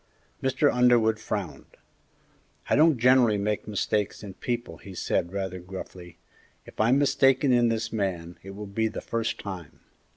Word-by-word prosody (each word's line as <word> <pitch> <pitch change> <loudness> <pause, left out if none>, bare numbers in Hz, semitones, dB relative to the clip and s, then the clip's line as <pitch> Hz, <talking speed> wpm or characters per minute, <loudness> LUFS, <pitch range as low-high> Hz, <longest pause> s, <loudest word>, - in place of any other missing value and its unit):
Mr. 135 +2 +2
Underwood 120 -3 +4
frowned. 100 -8 -6 0.9
"I - - +5
don't 155 -1 +5
generally 120 -2 +4
make 105 +1 -2
mistakes 105 0 -1
in 100 -2 -8
people," 120 -6 -4
he 95 -2 -11
said, 85 -1 -1
rather 95 -2 -4
gruffly; 90 -1 -9 0.5
"if - - -15
I'm 120 +5 +4
mistaken 135 -1 +3
in 120 -1 +4
this 115 0 -2
man, 90 -5 -3
it 95 0 -10
will 105 +1 -7
be 110 +3 -1
the 110 - -5
first 115 -1 -2
time." 90 -6 -8
110 Hz, 155 wpm, -26 LUFS, 95-120 Hz, 0.9 s, I